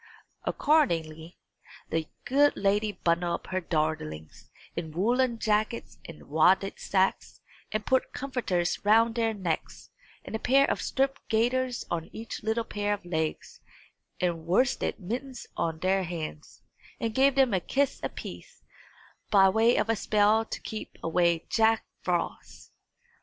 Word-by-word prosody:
Accordingly, 165 - +1 0.5
the 160 -1 -1 0.2
good 285 +3 +3
lady 205 +2 +1
bundled 170 -2 0
up - - -16
her 185 0 0
darlings 155 - -3 0.3
in 165 -2 -4
woollen 240 +7 +1
jackets 215 +1 -1
and 165 - -11
wadded 180 +6 +3
sacks, 190 -1 0 0.3
and 215 0 -2
put 260 0 +1
comforters 235 -10 -2
round 225 +2 +4
their 225 -1 +1
necks, 175 -5 -4 0.3
and - - -5
a - - -2
pair 275 +4 +4
of - - -2
striped 270 0 0
gaiters 245 +3 +1
on 165 -1 -2
each 225 +1 -7
little 220 +2 0
pair 205 -1 -1
of 200 -3 -17
legs, 160 -3 -3 0.6
and 170 -2 -1
worsted 245 +10 +1
mittens 245 +7 -5
on 165 -1 -1
their 190 +3 +1
hands, 160 -3 -7 0.4
and 230 -3 -2
gave 270 +2 +4
them 265 -4 +4
a 190 - +3
kiss 275 +9 0
apiece, - - -8 0.7
by 195 -2 +6
way 225 +4 +4
of - - +1
a 225 - +2
spell 210 +1 +3
to - - -6
keep 220 - -7
away 170 0 +2
Jack 225 0 +2 0.2
Frost. - - -3
205 Hz, 140 wpm, -28 LUFS, 170-235 Hz, 0.7 s, by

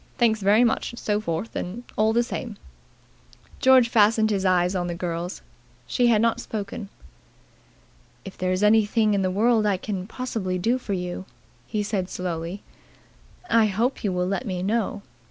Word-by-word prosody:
Thanks 220 -3 +2
very 205 +4 +5
much 235 - 0
and - - -10
so 210 -2 -1
forth 170 +3 -4 0.4
all 215 +1 +3
the 235 +2 +2
same." 235 -2 -6 1.0
George 260 -2 +6
fastened 220 -1 +3
his 195 -2 0
eyes 180 0 +3
on 180 -2 -1
the 175 - -3
girl's. 170 0 -4 0.4
She 245 -1 +1
had 225 -2 +4
not 230 -1 +2
spoken. 205 -1 -6 1.4
"If 195 - -8
there 185 0 -1
is 185 +2 0
anything 215 0 +3
in 200 - +1
the 185 - +1
world 215 +3 +2
I 200 -2 +2
can 190 -1 -5
possibly 220 -7 -3
do 235 +8 +1
for 215 -5 -4
you," 180 0 -4 0.4
he 210 -1 -2
said 195 -3 -2
slowly, 175 +1 -4 0.8
"I 230 -6 +4
hope 225 +6 -1
you 200 - 0
will 180 0 0
let 195 +6 -2
me 180 -2 -3
know. 210 0 -1
205 Hz, 170 wpm, -24 LUFS, 185-225 Hz, 1.4 s, George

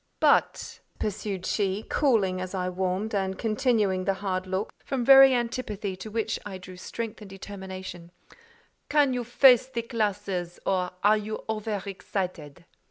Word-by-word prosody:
"But," - - +2 0.2
pursued 200 -3 -3
she, 200 0 -1
cooling 205 -10 +2
as 185 +1 -5
I 180 -1 -1
warmed, 185 +4 -2
and 190 -1 -1
continuing 215 -5 +1
the 195 - +1
hard 190 -1 -3
look, 190 +3 -2
from 255 -3 -2
very 270 0 +9
antipathy 230 -5 -2
to 215 - -8
which 225 0 -2
I 195 -2 -6
drew 185 0 -11
strength 225 +4 -6
and 205 - -10
determination, 190 -3 -8 0.8
"can 290 -3 +3
you 245 -1 -1
face 250 +1 +5
the 235 -3 -4
classes, 205 -6 -2
or 185 -2 +1
are 210 +1 +5
you 215 +1 -5
over 215 -2 -3
excited?" 180 -5 -5
205 Hz, 150 wpm, -27 LUFS, 185-225 Hz, 0.8 s, very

